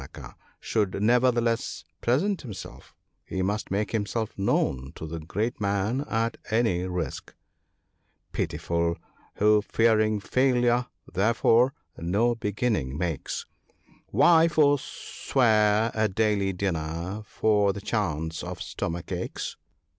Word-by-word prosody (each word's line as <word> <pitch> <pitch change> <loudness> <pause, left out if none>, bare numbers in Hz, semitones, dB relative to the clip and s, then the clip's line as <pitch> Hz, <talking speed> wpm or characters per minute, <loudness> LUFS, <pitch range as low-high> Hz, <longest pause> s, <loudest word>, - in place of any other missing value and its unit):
*A - - -7
dependant/ - - -16
replied - - -9
Damanaka, - - -32
'should 105 -4 0
neverthe 120 +3 +3
less 115 -1 -1 0.2
present 180 - +1
himself; 110 -9 -10 0.3
he 95 - -3
must 105 +3 -2
make 100 0 -1
himself 110 0 -2
known 70 -8 0
to - - -7
the 80 +1 -5
great 105 +9 -3
man, 100 +5 0
at 115 0 0
any 110 -5 +1
risk, 90 -7 -4 0.3
— - - -48
" - - -46
Pitiful, 85 +2 -1 0.4
who 105 0 +4
fearing 110 -1 +2
failure, 125 +1 +2 0.2
therefore 115 +6 +3 0.2
no 100 +8 +2
beginning 105 - -1
makes, 85 -4 -3 0.6
Why 160 - +5
forswear 120 -7 +2
a 110 -1 +1
daily 100 -1 +1
dinner 90 +1 -3
for 105 -2 +2
the 100 - -6
chance 80 -8 -2
of - - -5
stomachaches 85 +1 -4
105 Hz, 125 wpm, -26 LUFS, 90-115 Hz, 0.6 s, Why